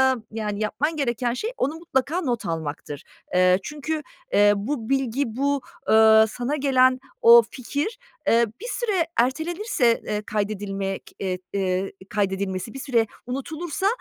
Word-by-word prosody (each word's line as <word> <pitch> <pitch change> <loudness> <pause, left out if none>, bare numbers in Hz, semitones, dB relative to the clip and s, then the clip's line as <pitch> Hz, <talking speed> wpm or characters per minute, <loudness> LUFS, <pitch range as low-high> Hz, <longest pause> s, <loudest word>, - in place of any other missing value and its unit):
eee, 230 - -9
yani 210 -2 -3
yapman 290 +9 -1
gereken 240 -4 0
şey 430 - -3
onu 285 +5 0
mutlaka 325 +1 -1
not 240 -6 -2
almaktır. 150 -3 -4 0.3
Eee, 185 +1 +5
çünkü, 300 +3 -4 0.3
eee, 205 0 +6
bu 225 +3 -3
bilgi, 270 -1 +1
bu, 280 +1 +1 0.3
ııı, 220 0 +7
sana 245 +6 -3
gelen 260 -2 +3 0.2
o 235 0 +9
fikir, 290 - -3 0.3
eee, 235 +1 +5 0.2
bir 475 - -6
süre 420 -9 0
ertelenirse, 315 - +1
eee, 210 0 -2
kaydedilmek 200 -2 -3
eee, 185 -2 -2 0.2
eee, 190 0 0 0.2
kaydedilmesi 195 0 -2
bir 270 - -7
süre 235 -5 +1 0.2
unutulursa 310 +9 -3
240 Hz, 135 wpm, -24 LUFS, 205-285 Hz, 0.3 s, o